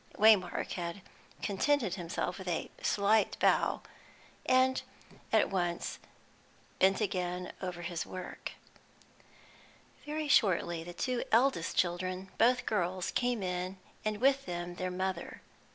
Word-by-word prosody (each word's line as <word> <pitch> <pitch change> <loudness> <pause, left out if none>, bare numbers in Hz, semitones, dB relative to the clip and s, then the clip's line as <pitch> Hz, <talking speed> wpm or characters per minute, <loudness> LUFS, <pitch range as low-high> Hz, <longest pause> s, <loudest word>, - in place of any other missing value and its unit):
Waymark 205 -4 +4
had 175 +2 -4 0.4
contented 215 0 +1
himself 175 0 -3
with 190 - -8
a 170 -2 -2
slight 210 +1 +2
bow, - - +2 0.6
and 260 0 +4 0.5
at - - +3
once 175 -2 -1 0.8
bent 190 +3 +4
again 180 -2 -2
over 180 -2 -4
his 170 -1 -2
work. 185 -1 -7 1.5
Very 305 +1 -3
shortly 175 - +3
the 175 +1 -8
two 250 +6 -1
eldest 235 -7 +3
children, 185 +2 0
both 240 +1 +4
girls, 185 -3 0
came 245 -4 0
in, 180 +1 -2 0.3
and 215 -1 -1
with 270 +2 +3
them 175 0 -4
their 185 0 -2
mother. 185 -1 -3
185 Hz, 120 wpm, -32 LUFS, 175-220 Hz, 1.5 s, Waymark